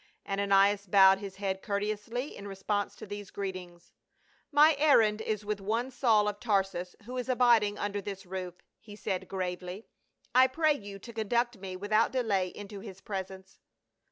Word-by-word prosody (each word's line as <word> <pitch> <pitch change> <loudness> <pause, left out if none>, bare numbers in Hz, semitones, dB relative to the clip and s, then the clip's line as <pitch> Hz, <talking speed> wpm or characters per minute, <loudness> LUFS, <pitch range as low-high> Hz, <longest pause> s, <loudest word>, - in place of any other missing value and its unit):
Ananias 200 0 +3
bowed 190 0 +6
his 195 -2 -7
head 195 -1 -3
courteously 210 +6 -3
in 200 - -8
response 200 +1 -2
to - - -9
these 205 -1 -7
greetings. 185 -3 -7 0.3
" - - -37
My 300 +1 +6
errand 225 -8 +4
is 215 -1 -3
with 210 -1 -2
one 230 +6 -1
Saul 225 -5 +3
of 205 0 -3
Tar 205 -4 +2
sus, 180 -1 -7
who 250 +2 -6
is 250 +1 -4
abiding 235 -5 +4
under 205 0 -2
this 195 -1 -7
roof," 180 -1 -6 0.2
he 210 -2 -12
said 190 -3 -3
gravely. 180 +1 -4 0.3
" - - -39
I 255 +1 +7
pray 310 +3 +2
you 205 -7 -8
to 235 +4 -11
conduct 235 +1 0
me 185 -1 -6
without 210 +4 +1
delay 210 -8 +1
into 205 +2 -9
his 195 -2 -10
presence." 190 -1 -7
205 Hz, 175 wpm, -30 LUFS, 195-225 Hz, 0.3 s, I